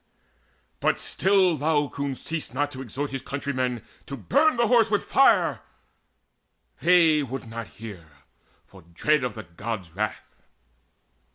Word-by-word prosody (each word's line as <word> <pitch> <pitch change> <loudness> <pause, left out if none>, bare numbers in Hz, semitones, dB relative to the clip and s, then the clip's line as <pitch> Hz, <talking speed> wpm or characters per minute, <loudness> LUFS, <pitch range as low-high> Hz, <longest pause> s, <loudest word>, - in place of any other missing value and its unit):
But - - +1
still 190 -3 +2
Laocoon 145 -2 -1
ceased 155 -4 -5
not 145 +1 0
to 130 -2 -8
exhort 135 +3 -4
His 135 -1 -4
countrymen 130 -4 -3 0.2
to 140 - -6
burn 285 - +2
the 235 - +3
Horse 230 -1 +4
with 205 -1 0
fire: 275 - +4 1.2
They 165 -4 +5
would 130 -2 -5
not 115 -1 -6
hear, 105 -7 -10 0.6
for - - -16
dread 125 - 0
of 125 -4 -3
the - - -7
Gods' 95 +1 -6
wrath. 105 +4 -5
140 Hz, 130 wpm, -25 LUFS, 115-165 Hz, 1.2 s, They